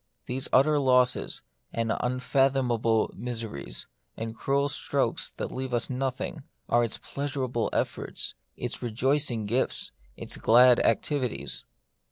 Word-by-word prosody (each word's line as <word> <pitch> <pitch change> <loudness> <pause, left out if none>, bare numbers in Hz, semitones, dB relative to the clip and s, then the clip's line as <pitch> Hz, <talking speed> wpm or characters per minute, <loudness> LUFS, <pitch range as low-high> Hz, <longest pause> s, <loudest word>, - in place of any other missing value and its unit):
These 130 +1 -1
utter 145 +3 +5
losses, 125 -2 +2 0.3
and 115 -1 0
unfathomable 125 -3 +2
miseries, 115 - -5 0.3
and 115 0 -4
cruel 140 +4 +1
strokes 145 - 0
that - - -3
leave 130 -1 -2
us 120 +2 0
nothing, 130 +4 -2 0.3
are 120 0 +3
its 115 - -2
pleasurable 130 -4 -2
efforts, - - -2 0.2
its - - -4
rejoicing 120 0 +1
gifts, 120 +5 0 0.3
its - - -4
glad 125 +2 +6
activities. 130 +1 0
125 Hz, 115 wpm, -28 LUFS, 115-135 Hz, 0.3 s, glad